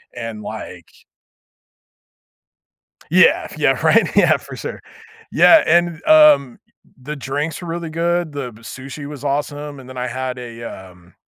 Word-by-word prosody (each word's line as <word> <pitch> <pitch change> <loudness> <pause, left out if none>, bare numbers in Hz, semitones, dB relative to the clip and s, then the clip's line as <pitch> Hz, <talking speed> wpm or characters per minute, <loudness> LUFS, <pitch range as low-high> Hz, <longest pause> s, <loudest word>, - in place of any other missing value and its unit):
and, 115 -3 -6
like - - -8 2.2
Yeah, 240 - +4
yeah, - - +3
right, - - +4
yeah, - - +5
for - - -11
sure, - - -7 0.5
yeah, 325 - +6
and, 170 0 +2
um 305 - +5 0.4
the 150 +2 -5
drinks 145 +4 -4
were 175 - -7
really 165 -1 -5
good, 170 0 -1
the 135 -4 -5
sushi 135 +5 -9
was 145 -2 -9
awesome, 145 0 -3
and 130 - -13
then 130 - -10
I 125 0 -2
had 130 +1 -4
a, 115 -1 -9
um 90 -4 -11
145 Hz, 140 wpm, -19 LUFS, 125-165 Hz, 2.2 s, yeah